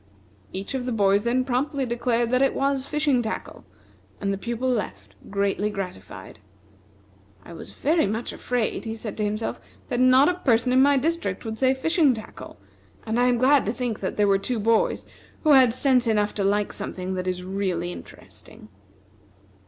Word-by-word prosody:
Each 195 Hz, +7 st, -5 dB
of 255 Hz, -2 st, -3 dB
the -, -, -1 dB
boys 200 Hz, -2 st, +3 dB
then 245 Hz, +3 st, 0 dB
promptly 270 Hz, +2 st, -1 dB
declared 240 Hz, 0 st, 0 dB
it 270 Hz, +2 st, +3 dB
was 275 Hz, -1 st, 0 dB
fishing 295 Hz, -4 st, +1 dB
tackle, 220 Hz, -1 st, -6 dB, 0.6 s
and 200 Hz, 0 st, -1 dB
the -, -, -3 dB
pupil 235 Hz, +3 st, -3 dB
left, 100 Hz, -, -3 dB, 0.2 s
greatly 200 Hz, +1 st, 0 dB
gratified. 180 Hz, -, -8 dB, 1.1 s
"I -, -, -10 dB
was -, -, -9 dB
very 315 Hz, -3 st, +1 dB
much 220 Hz, +4 st, -3 dB
afraid," 245 Hz, -3 st, -2 dB
he 225 Hz, 0 st, -4 dB
said 220 Hz, -1 st, -6 dB
to 215 Hz, -, -1 dB
himself, 210 Hz, +2 st, -3 dB, 0.3 s
"that 245 Hz, -, -1 dB
not 255 Hz, +2 st, +6 dB
a 360 Hz, -, +3 dB
person 250 Hz, -3 st, +2 dB
in 260 Hz, -, +5 dB
my 280 Hz, +1 st, +5 dB
district 270 Hz, -, -2 dB
would 220 Hz, 0 st, -5 dB
say 260 Hz, 0 st, +3 dB
fishing 300 Hz, -1 st, +2 dB
tackle; 220 Hz, 0 st, -10 dB, 0.5 s
and 225 Hz, +1 st, -1 dB
I 245 Hz, -, +4 dB
am 245 Hz, -1 st, +2 dB
glad 270 Hz, +3 st, +4 dB
to -, -, +1 dB
think 240 Hz, -3 st, -3 dB
that 190 Hz, -, -4 dB
there 205 Hz, -1 st, +3 dB
were 195 Hz, -1 st, +3 dB
two 245 Hz, +4 st, -2 dB
boys 225 Hz, +1 st, +1 dB, 0.4 s
who 310 Hz, -, +4 dB
had 260 Hz, -4 st, +7 dB
sense 255 Hz, 0 st, +2 dB
enough 210 Hz, -2 st, +1 dB
to 200 Hz, -, -2 dB
like 205 Hz, +1 st, 0 dB
something 185 Hz, 0 st, -5 dB
that 185 Hz, 0 st, -3 dB
is 180 Hz, 0 st, -2 dB
really 185 Hz, -2 st, -2 dB
interesting." -, -, -12 dB
230 Hz, 180 wpm, -24 LUFS, 200-260 Hz, 1.1 s, had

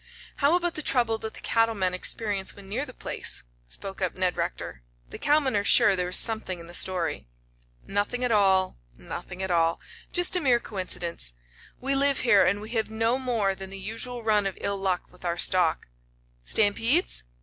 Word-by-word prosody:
"How 290 Hz, +3 st, +3 dB
about 350 Hz, -1 st, 0 dB
the 310 Hz, -, -4 dB
trouble 235 Hz, -6 st, +1 dB
that 220 Hz, 0 st, -7 dB
the -, -, -10 dB
cattle 225 Hz, 0 st, +1 dB
men 185 Hz, -2 st, 0 dB
experience 195 Hz, +1 st, -1 dB
when 200 Hz, -1 st, -12 dB
near 255 Hz, +9 st, -3 dB
the -, -, -8 dB
place?" -, -, -2 dB, 0.2 s
spoke 195 Hz, -, -6 dB
up 185 Hz, -, -1 dB
Ned 185 Hz, -1 st, 0 dB
Rector. -, -, -4 dB, 0.3 s
"The -, -, -8 dB
cowmen 290 Hz, -5 st, +2 dB
are 200 Hz, -, +1 dB
sure 200 Hz, 0 st, +6 dB
there 180 Hz, -1 st, -1 dB
is 180 Hz, -, +4 dB
something 220 Hz, -6 st, +2 dB
in 170 Hz, -, -11 dB
the 170 Hz, -, -11 dB
story." 180 Hz, -, -1 dB, 0.6 s
"Nothing 205 Hz, +5 st, -1 dB
at 250 Hz, -, +1 dB
all 190 Hz, -, +3 dB, 0.2 s
nothing 180 Hz, -, -7 dB
at 190 Hz, -, -2 dB
all. 165 Hz, -1 st, +2 dB, 0.3 s
Just 355 Hz, +1 st, +1 dB
a 360 Hz, -, +1 dB
mere 250 Hz, -5 st, +3 dB
coincidence. 175 Hz, -, -2 dB, 0.5 s
We 270 Hz, +2 st, -1 dB
live 275 Hz, 0 st, +2 dB
here 205 Hz, -6 st, +5 dB
and 200 Hz, +3 st, +1 dB
we 215 Hz, +2 st, -9 dB
have 225 Hz, -2 st, -1 dB
no 225 Hz, +3 st, 0 dB
more 230 Hz, -7 st, 0 dB
than 190 Hz, 0 st, -8 dB
the 195 Hz, -, -8 dB
usual 225 Hz, +5 st, -6 dB
run 210 Hz, -2 st, +2 dB
of 195 Hz, -, -6 dB
ill 200 Hz, 0 st, -2 dB
luck 190 Hz, -2 st, 0 dB
with 180 Hz, -, -19 dB
our 170 Hz, -1 st, -1 dB
stock." 180 Hz, -3 st, +3 dB, 0.6 s
"Stampedes?" 225 Hz, -, +3 dB
205 Hz, 195 wpm, -26 LUFS, 185-240 Hz, 0.6 s, sure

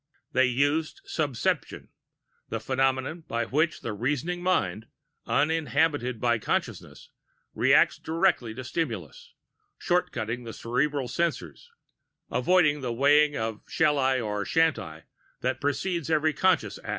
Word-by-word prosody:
They 130 Hz, +1 st, +4 dB
used 145 Hz, +5 st, 0 dB
"subception," 145 Hz, -7 st, -2 dB, 0.6 s
the 115 Hz, -, -3 dB
phenomenon 130 Hz, +6 st, 0 dB
by 115 Hz, 0 st, -1 dB
which 155 Hz, +4 st, 0 dB
the 115 Hz, -, -4 dB
reasoning 145 Hz, -, -2 dB
mind, 110 Hz, -, 0 dB, 0.4 s
uninhibited 145 Hz, -4 st, +1 dB
by 120 Hz, -1 st, +1 dB
consciousness, -, -, -4 dB, 0.4 s
reacts -, -, +4 dB
directly 160 Hz, -9 st, 0 dB
to 130 Hz, -, -6 dB
stimuli 120 Hz, -, -3 dB, 0.7 s
shortcutting 120 Hz, -9 st, -1 dB
the 115 Hz, -1 st, -7 dB
cerebral 135 Hz, +3 st, -1 dB
censor, 170 Hz, +7 st, -2 dB, 0.8 s
avoiding 155 Hz, -5 st, +3 dB
the 125 Hz, -2 st, -2 dB
weighing 145 Hz, +4 st, +4 dB
of 110 Hz, -1 st, -3 dB
shall 150 Hz, -2 st, +2 dB
I 130 Hz, -1 st, +2 dB
or 105 Hz, -3 st, -2 dB
shan't 165 Hz, +5 st, +2 dB
I 80 Hz, -3 st, -9 dB, 0.4 s
that 130 Hz, 0 st, -1 dB
precedes 165 Hz, +3 st, -1 dB
every 155 Hz, -1 st, +2 dB
conscious 170 Hz, -, +1 dB
act. -, -, -11 dB
135 Hz, 125 wpm, -27 LUFS, 120-155 Hz, 0.8 s, They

